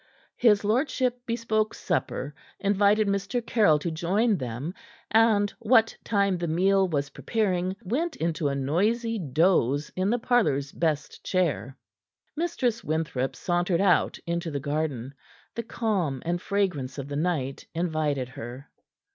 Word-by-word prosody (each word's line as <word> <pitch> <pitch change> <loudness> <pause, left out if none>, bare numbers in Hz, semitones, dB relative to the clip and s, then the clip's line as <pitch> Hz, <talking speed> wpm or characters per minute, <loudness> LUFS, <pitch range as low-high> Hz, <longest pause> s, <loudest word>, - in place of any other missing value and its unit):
His 210 -4 +4
lordship 250 +2 0
bespoke 220 -2 0
supper, 150 -5 -2 0.3
invited 205 +1 +3
Mr. 200 +5 0
Caryll 205 -12 +4
to 165 +3 -3
join 195 +8 +1
them, 130 +6 -4 0.4
and, 220 -2 +4
what 225 -1 +4
time 200 -4 +1
the 170 - -2
meal 190 +4 +3
was 145 -4 -2
preparing, 185 -1 -1
went 300 - -1
into 160 -2 -1
a 140 - -1
noisy 215 - 0
doze 150 -3 +2
in 185 +2 +1
the 240 - +2
parlor's 220 - +1
best 155 -3 -2
chair. 155 -7 -1 0.6
Mistress 270 -9 -1
Winthrop 150 -5 -1
sauntered 175 +2 0
out 185 -4 +3
into 170 0 -2
the 145 -2 -3
garden. 145 -3 -2 0.4
The 235 - -3
calm 195 - -1
and 175 +1 -1
fragrance 180 -12 -1
of 140 -1 -5
the 145 - -5
night 145 -4 -2
invited 155 -6 -1
her. 125 +1 -9
180 Hz, 135 wpm, -26 LUFS, 145-215 Hz, 0.6 s, His